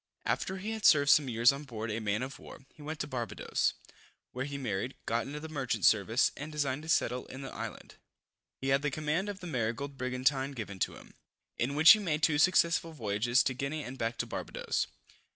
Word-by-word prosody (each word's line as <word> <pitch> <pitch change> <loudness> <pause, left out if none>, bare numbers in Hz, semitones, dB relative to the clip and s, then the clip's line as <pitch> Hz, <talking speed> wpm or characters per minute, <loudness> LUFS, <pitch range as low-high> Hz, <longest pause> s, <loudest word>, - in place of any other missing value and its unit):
After 190 - -1
he 205 +4 -4
had 220 -1 -5
served 145 -5 +6
some 145 -3 +5
years 120 +2 +5
on 140 +2 -6
board 110 -5 -5
a 110 - -2
man 105 +2 -1
of 130 +1 -7
war, 135 - -12
he - - -16
went 155 +1 -6
to - - -1
Barbadoes, 120 -6 -1 0.6
where 125 +1 -3
he 140 0 -5
married, 120 -1 -3
got 115 +2 -1
into 145 +2 -5
the 160 - -7
merchant 140 -5 -1
service, 110 +4 +4
and 150 +2 -7
designed 145 -2 -1
to 160 - -9
settle 125 -6 +1
in 130 +1 -8
the 135 - -7
island. - - -7 0.6
He 135 - -3
had 135 +1 +3
the 150 - 0
command 155 +7 -1
of 195 -2 -6
the - - -7
Marygold 135 -1 -3
brigantine 130 +2 0
given 105 -6 -6
him, - - -4 0.5
in 135 +4 0
which 155 +2 +9
he 215 - +7
made 160 -6 -1
two 150 -2 +3
successful 170 -1 +3
voyages 115 -1 +1
to 130 - 0
Guinea 140 +4 -3
and 125 - -7
back 115 -2 -2
to - - -1
Barbadoes. - - -3
135 Hz, 210 wpm, -31 LUFS, 120-150 Hz, 0.6 s, which